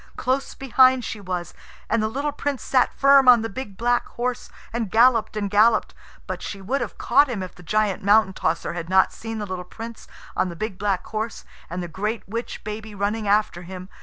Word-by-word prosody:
Close 260 +2 -1
behind 260 -1 +4
she 210 - -5
was, 180 -2 -4 0.3
and 230 0 +1
the 215 - +1
little 280 +6 -2
Prince 285 -4 -3
sat 255 -2 +2
firm 275 -1 +5
on 240 -3 +8
the 225 - -3
big 200 -3 -7
black 240 +1 +1
horse, 245 +1 -4 0.2
and 230 -3 -2
galloped 230 +1 +4
and 200 -2 -2
galloped. 215 +2 +4 0.3
But - - -5
she 200 - -6
would 255 +9 -2
have - - -5
caught 285 -1 +4
him 210 -6 -3
if 185 - -8
the - - -15
giant 210 +2 0
Mountain 205 -1 +4
tosser 170 -2 -1
had 170 -1 -5
not 190 0 +4
seen 225 0 -6
the 210 - -3
little 185 -2 -5
Prince 225 +5 -9 0.3
on 185 - +1
the 170 - -7
big 215 0 -5
black 200 -3 0
horse, 220 +1 -4 0.2
and 180 +2 -4
the - - -5
great 210 +7 -3
witch 230 +4 -5
baby 215 0 -6
running 205 +2 -1
after 205 -3 +2
him. 185 +1 -9
215 Hz, 210 wpm, -23 LUFS, 190-240 Hz, 0.3 s, on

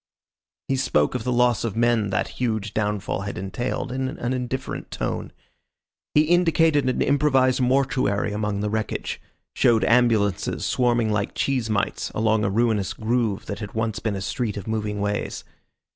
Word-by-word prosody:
He 135 - 0
spoke 75 - +2
of 125 -3 -3
the 125 - -1
loss 120 -1 +3
of 115 -4 -2
men 115 -3 +2
that 95 - 0
huge 110 -5 -1
downfall 105 -2 -1
had 100 -2 -5
entailed 120 +7 -3
in 130 +1 -1
an 130 -3 -3
indifferent 130 +1 -4
tone. - - -3 0.8
He 150 - +7
indicated 165 -4 +3
an 130 - +1
improvised 135 -3 +3
mortuary 125 -6 +1
among 105 -1 -2
the 105 - -1
wreckage, 110 0 -3 0.3
showed 115 -2 +3
ambulances 115 -5 +2
swarming 120 -3 +2
like 105 -1 -1
cheese 130 -5 0
mites 105 -2 -1
along 110 -1 +2
a 100 - +1
ruinous 110 -2 +1
groove 110 -3 -1
that 100 -1 -5
had 105 -1 -7
once 110 -1 -1
been 110 -3 -2
a 95 - -4
street 105 +2 -2
of 100 - -6
moving 105 -2 -2
ways. 100 0 -2
115 Hz, 160 wpm, -24 LUFS, 105-125 Hz, 0.8 s, He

